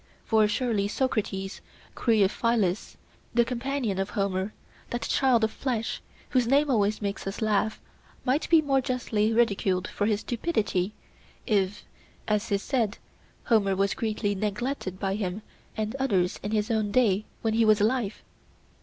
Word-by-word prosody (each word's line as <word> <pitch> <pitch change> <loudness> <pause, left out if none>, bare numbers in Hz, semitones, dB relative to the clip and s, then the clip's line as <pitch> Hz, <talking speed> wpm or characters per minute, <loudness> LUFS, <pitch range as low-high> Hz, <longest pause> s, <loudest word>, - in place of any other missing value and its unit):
For 220 -2 +4
surely, 210 -2 0
Socrates, 205 -5 -2 0.3
Creophylus, 215 -2 +1 0.4
the 235 -1 +5
companion 250 -4 -2
of 195 +1 -1
Homer, 195 0 -1 0.4
that 240 - -3
child 255 -4 +3
of 220 - +2
flesh, 235 -4 -2 0.3
whose 250 -3 +2
name 280 +3 +3
always 210 -2 +1
makes 200 0 -3
us 195 - -4
laugh, 215 0 +1 0.5
might 270 +4 +1
be 325 -2 +6
more 270 -2 +2
justly 230 -4 0
ridiculed 200 -5 +2
for 205 - -1
his 215 -1 +1
stupidity, 215 - -1 0.5
if, 205 -3 0 0.4
as 210 +1 0
is 200 0 +1
said, 230 -7 0 0.5
Homer 200 -5 +3
was 195 +1 +1
greatly 215 -3 -1
neglected 210 0 -3
by 195 -1 -1
him 200 0 -3 0.3
and 215 +2 -2
others 195 -9 +1
in 205 - -3
his 215 +1 0
own 215 -2 +1
day 215 -4 +3 0.2
when 220 -1 +1
he 225 +1 +3
was 215 -1 +5
alive? 220 0 0
215 Hz, 145 wpm, -27 LUFS, 200-240 Hz, 0.5 s, be